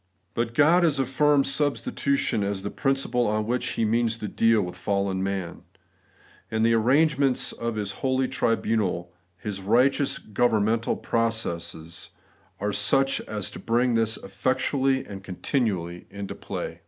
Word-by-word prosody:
But 115 0 -2
God 160 +6 +5
has 160 -5 +3
affirmed 140 +2 +3
suistitution 140 -3 0
as 100 -1 -2
the 100 - -3
principle 135 -3 0
on 105 0 0
which 120 +2 -1
he 115 - 0
means 115 +1 +1
to 105 - -5
deal 115 0 +3
with 90 0 -6
fallen 100 0 -1
man; 95 -3 -3 0.9
and 110 0 +1
the 115 - +4
arrangements 135 +2 +3
of 115 -1 -4
His 105 -2 -2
holy 130 0 +1
tribunal. 110 -8 0 0.2
His 100 0 -5
righteous 125 +7 +2
governmental 110 0 +1
processes, 85 -8 -2 0.5
are 105 +1 -1
such 135 +7 +3
as 105 -3 -3
to - - -9
bring 120 +2 +1
this 115 -1 +2
effectually 130 +6 0
and 95 -1 -9
continually 90 -3 -2
into 100 0 -6
play. - - -6
115 Hz, 140 wpm, -25 LUFS, 100-130 Hz, 0.9 s, God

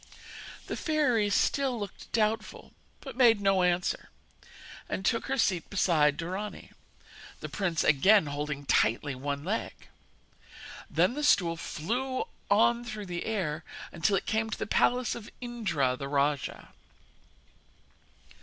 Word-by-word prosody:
The - - -4
fairy 255 -10 +1
still 260 +4 +1
looked 205 -1 -8
doubtful, 220 0 -1 0.3
but 270 -4 -8
made 235 -4 +5
no 195 -2 +3
answer, 180 0 0 0.8
and 190 - -3
took 230 +2 +1
her 270 0 -1
seat 185 -8 +1
beside 155 -7 +2
Dorani, 190 +5 -5 0.7
the - - -6
prince 180 -5 -1
again 190 +7 +5
holding 145 0 -4
tightly 135 +3 +2
one 140 +2 -4
leg. 205 +7 -4 1.0
Then - - +2
the 295 +2 -4
stool 175 -11 +3
flew 245 +12 -3 0.3
on 235 +3 +4
through 215 -3 -6
the 175 -2 -4
air 175 -8 -2 0.3
until 185 +4 +1
it - - -1
came 220 0 0
to - - -4
the - - -3
palace 245 +2 +2
of 235 -2 -8
Indra 190 - -1
the 140 +2 -6
rajah. 140 0 -1
200 Hz, 130 wpm, -29 LUFS, 155-230 Hz, 1.0 s, made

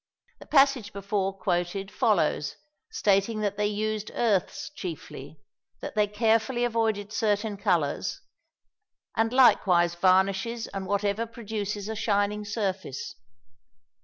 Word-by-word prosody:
The - - -13
passage 275 -6 +3
before 200 0 -1
quoted 185 +1 -2
follows, 175 - +1 0.3
stating 210 - +1
that 205 -1 -1
they 210 0 +1
used 215 0 -2
earths 210 0 0
chiefly, 155 - -8 0.4
that - - -6
they 210 -1 +2
carefully 225 +3 +1
avoided 220 -3 -1
certain 210 -1 0
colours, 180 -8 0 1.0
"and 225 0 +1
likewise 180 -9 +5
varnishes 190 +6 +2
and 195 -1 -6
whatever 205 +3 0
produces 210 -3 -4
a 220 - -3
shining 210 0 0
surface. 195 - -3
205 Hz, 110 wpm, -27 LUFS, 195-220 Hz, 1.0 s, likewise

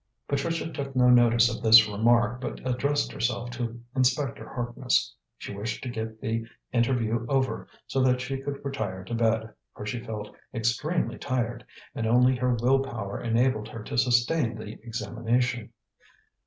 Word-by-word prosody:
Patricia 165 +4 -1
took 135 -1 -5
no 125 -1 +5
notice 120 -1 +6
of - - -9
this 110 0 +8
remark, 120 +3 +2
but - - -4
addressed 140 +3 0
herself 120 0 -2
to 120 -1 -4 0.2
Inspector 130 0 +1
Harkness. - - -1 0.2
She - - -7
wished 105 +3 -4
to 130 - -4
get 110 -1 -5
the 115 +1 -2 0.3
interview 120 -2 +1
over, 135 -1 0 0.2
so 135 - 0
that 125 -1 +3
she 135 +2 -4
could 140 0 -5
retire 105 -9 -3
to 95 - -7
bed, 110 -1 +1 0.2
for 105 - -7
she 120 +3 -3
felt 105 -3 -6 0.2
extremely 120 +10 0
tired, 120 -3 -2 0.3
and 115 - -2
only 125 +3 +5
her 125 0 +1
will 125 +4 +3
power 110 -7 -4
enabled 115 -1 +1
her 115 -1 -8
to - - -6
sustain 120 +1 +2
the 105 - -7
examination. 120 +1 -1
120 Hz, 155 wpm, -27 LUFS, 115-130 Hz, 0.3 s, this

